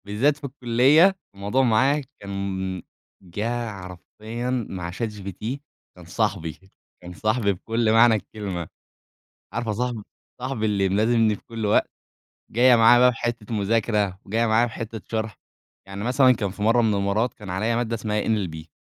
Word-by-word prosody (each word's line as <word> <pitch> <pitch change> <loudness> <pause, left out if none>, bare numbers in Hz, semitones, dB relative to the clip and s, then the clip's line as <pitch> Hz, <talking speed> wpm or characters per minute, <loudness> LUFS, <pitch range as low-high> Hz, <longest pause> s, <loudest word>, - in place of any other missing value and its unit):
بالذات 125 +9 +1
في 150 - -23
الكلّية 140 +7 +4 0.2
الموضوع 105 +7 0
معاه 130 +5 +3 0.2
كان 95 -2 -4 0.4
جَه 110 +5 -3
حرفيًا 110 +6 -5
مع 85 -2 -5
ChatGPT، 105 +3 -5 0.4
كان 90 -2 -14
صاحبي، 85 -4 -2 0.4
كان 90 0 -9
صاحبي 110 +1 +1
بكل 115 +4 0
معنى 115 0 +6
الكلمة، 100 -5 -5 0.9
عارفة 120 -2 -2
صاحبي، 120 +1 -2 0.4
صاحبي 130 -4 -2
اللي 100 -2 +1
ملازمني 110 +2 +2
في - - -16
كل 115 -2 -4
وقت؟ 105 - +2 0.6
جاية 125 +2 +5
معايا 115 +1 +7
بقى 125 0 +6
في 115 - -10
حتة 120 -2 -3
مذاكرة، 105 -2 0
جاية 115 +4 +1
معايا 110 +2 +3
في 115 - -8
حتة 115 -1 -6
شرح، 110 -2 -3 0.5
يعني 100 +1 -6
مثلًا 130 +1 +5
كان 105 -5 -2
في 105 +2 -8
مرّة 115 +3 +4
من 110 -2 +2
المرّات 100 +4 0
كان 105 -4 -10
عليّا 110 +6 0
مادة 115 -1 -1
اسمها 105 -1 -1
NLB 90 -8 -2
110 Hz, 155 wpm, -24 LUFS, 100-120 Hz, 0.9 s, معايا